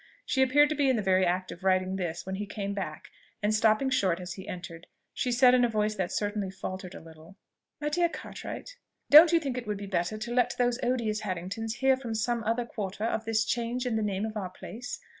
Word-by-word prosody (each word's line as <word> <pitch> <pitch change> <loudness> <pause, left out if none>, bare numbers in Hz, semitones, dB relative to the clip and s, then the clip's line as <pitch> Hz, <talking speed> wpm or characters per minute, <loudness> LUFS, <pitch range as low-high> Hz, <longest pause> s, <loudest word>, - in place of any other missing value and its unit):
She 265 - +1
appeared 290 +3 +5
to 310 - -1
be 280 -2 +2
in 260 - +3
the 215 - -1
very 185 -1 +3
act 185 +1 -1
of 170 - -10
writing 185 0 +2
this 175 -3 -3
when 190 - -4
he 205 +1 -4
came 200 -1 -4
back, 195 -1 -5 0.3
and 210 +1 +2
stopping 220 +5 +3
short 190 -9 +2
as 180 -1 -6
he 190 +1 -10
entered, 170 -2 -8 0.3
she 250 - -1
said 250 +1 +6
in 250 -1 +5
a 240 - +3
voice 215 -1 0
that 190 -4 -2
certainly 205 -2 -2
faltered 185 -1 -6
a - - -7
little, 160 +4 -15 0.4
"My 295 - -1
dear 345 +3 +2
Cartwright, - - -8 0.3
don't 310 +3 +10
you 335 - +5
think 270 -5 -3
it 240 - -10
would 210 -1 -2
be 200 - -6
better 185 +1 -1
to 235 +2 -5
let 245 -1 +2
those 245 0 +1
odious 235 -4 0
Harringtons 205 +3 -4
hear 265 0 +5
from 240 -4 -5
some 235 +1 0
other 230 +2 0
quarter 205 -2 -5
of 225 0 -1
this 220 -1 +1
change 240 +2 -1
in 245 -3 0
the 220 - +1
name 205 0 -1
of 220 0 -5
our 195 -4 -3
place? 230 +6 -8
215 Hz, 235 wpm, -29 LUFS, 190-245 Hz, 0.4 s, don't